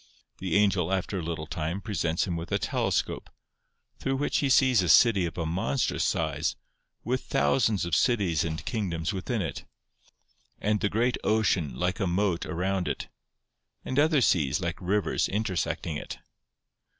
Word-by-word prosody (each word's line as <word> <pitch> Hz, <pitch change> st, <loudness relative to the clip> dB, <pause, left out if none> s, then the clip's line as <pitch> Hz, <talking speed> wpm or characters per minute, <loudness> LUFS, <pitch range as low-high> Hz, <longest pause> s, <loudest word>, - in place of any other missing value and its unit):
The 95 Hz, -3 st, -2 dB
angel, 95 Hz, -4 st, +3 dB
after 95 Hz, +1 st, -1 dB
a -, -, -3 dB
little 80 Hz, -1 st, -4 dB
time, 80 Hz, +4 st, -3 dB
presents 85 Hz, -6 st, -1 dB
him 90 Hz, -, -3 dB
with 85 Hz, +1 st, -6 dB
a -, -, +3 dB
telescope, -, -, -1 dB, 0.7 s
through 135 Hz, 0 st, -1 dB
which 145 Hz, +2 st, 0 dB
he 140 Hz, -, +1 dB
sees 130 Hz, -4 st, +5 dB
a 90 Hz, -, -1 dB
city 100 Hz, +1 st, +5 dB
of 85 Hz, -, -8 dB
a 85 Hz, -, -1 dB
monstrous 80 Hz, -5 st, 0 dB
size, -, -, 0 dB, 0.5 s
with 130 Hz, +3 st, -1 dB
thousands 95 Hz, -, +1 dB
of 85 Hz, -, -5 dB
cities 100 Hz, -, +2 dB
and 80 Hz, -1 st, -4 dB
kingdoms 90 Hz, -5 st, -2 dB
within 100 Hz, +3 st, -2 dB
it; 80 Hz, -, -5 dB, 1.0 s
and 105 Hz, 0 st, +1 dB
the 105 Hz, -, 0 dB
great 120 Hz, +4 st, +1 dB
ocean, 95 Hz, -, +1 dB
like 90 Hz, +7 st, -1 dB
a 95 Hz, -, 0 dB
moat, 90 Hz, 0 st, 0 dB
around 90 Hz, +1 st, -1 dB
it; -, -, -3 dB, 0.8 s
and 130 Hz, -, 0 dB
other 155 Hz, -1 st, +4 dB
seas, 75 Hz, -, +2 dB
like 85 Hz, 0 st, -4 dB
rivers, 100 Hz, +3 st, 0 dB
intersecting 95 Hz, -6 st, -2 dB
it. -, -, -7 dB
95 Hz, 160 wpm, -27 LUFS, 85-110 Hz, 1.0 s, sees